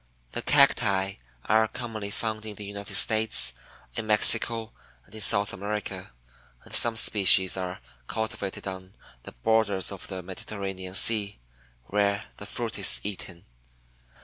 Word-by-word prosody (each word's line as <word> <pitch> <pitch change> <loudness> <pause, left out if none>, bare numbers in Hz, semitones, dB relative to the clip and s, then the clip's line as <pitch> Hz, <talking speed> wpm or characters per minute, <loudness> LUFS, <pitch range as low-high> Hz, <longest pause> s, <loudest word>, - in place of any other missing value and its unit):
The - - -4
Cacti 95 -2 +1 0.3
are 110 0 +2
commonly 110 -4 -7
found 110 +1 -5
in 105 - -8
the 105 - -10
United 100 0 -6
States, 110 - +4 0.4
in 110 -1 -6
Mexico, 115 +1 +4 0.3
and 95 - -19
in 110 - -3
South 100 -1 +3
America, 100 -3 -6 0.5
and - - -15
some 115 -1 +4
species 95 -4 +5
are 90 -1 -6 0.3
cultivated 110 -3 -5
on 95 0 -9 0.3
the - - -11
borders 100 - -1
of 100 - -8
the 95 -2 -8
Mediterranean 95 0 -7
Sea, 105 -1 +4 0.5
where 100 +6 -2
the - - -9
fruit - - -3
is - - +4
eaten. 95 -3 -8
100 Hz, 135 wpm, -25 LUFS, 95-110 Hz, 0.5 s, species